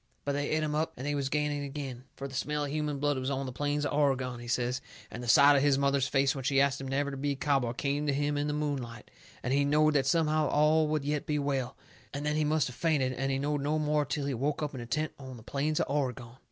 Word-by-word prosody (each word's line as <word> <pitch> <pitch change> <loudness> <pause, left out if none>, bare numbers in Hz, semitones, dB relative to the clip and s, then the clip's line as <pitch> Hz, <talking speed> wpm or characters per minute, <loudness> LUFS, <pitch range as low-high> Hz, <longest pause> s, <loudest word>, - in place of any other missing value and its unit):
But 145 - 0
they 145 +1 -1
et 155 0 +1
him 150 -1 -1
up 155 +1 -1
and 130 - -6
they 145 - 0
was 140 -2 -1
gaining 150 0 -1
agin, 135 -3 -6
fur 140 - -5
the 135 - -12
smell 150 +2 -1
of 140 - -5
human 150 -1 -1
blood 145 -1 0
was 130 +1 -2
on 135 0 -2
the 130 - -4
plains 145 +3 -1
of - - -2
Oregon, 130 -4 +1
he 120 - -9
says, 125 +1 0 0.3
and 115 - -6
the 120 - -6
sight 140 +4 +7
of 140 - +4
his 140 -1 +3
mother's 140 -1 +2
face 135 -1 +2
when 135 - -6
she 135 +1 +2
ast 140 0 +2
him 135 - -5
never 140 +1 -1
to 135 - -6
be 140 +1 -1
a - - -6
cowboy 135 -4 +1
come 140 +3 -1
to - - +3
him 145 +1 0
in 145 +1 0
the - - 0
moonlight, 135 -7 -4 0.3
and 125 - 0
he 140 +1 +3
knowed 150 +2 +3
that 135 -3 +2
somehow 155 -2 +2
all 150 +2 +3
would 150 -2 -1
yet 150 0 -1
be 150 - 0
well, 135 -3 -2 0.4
and 145 +1 -3
then 150 0 0
he 155 - +2
must 150 -1 +2
of 125 - -7
fainted 140 -4 +1
and 135 +1 -1
he 135 - 0
knowed 145 +1 -1
no 150 +2 0
more 150 -1 +1
till 145 0 -3
he 140 - -1
woke 140 +5 -1
up 150 - -3
in 130 - -6
a 120 - -7
tent 155 +6 -1
on 130 -2 -9
the 110 - -13
plains 150 +5 -1
of - - +2
Oregon. 130 -4 -2
140 Hz, 285 wpm, -30 LUFS, 135-150 Hz, 0.4 s, sight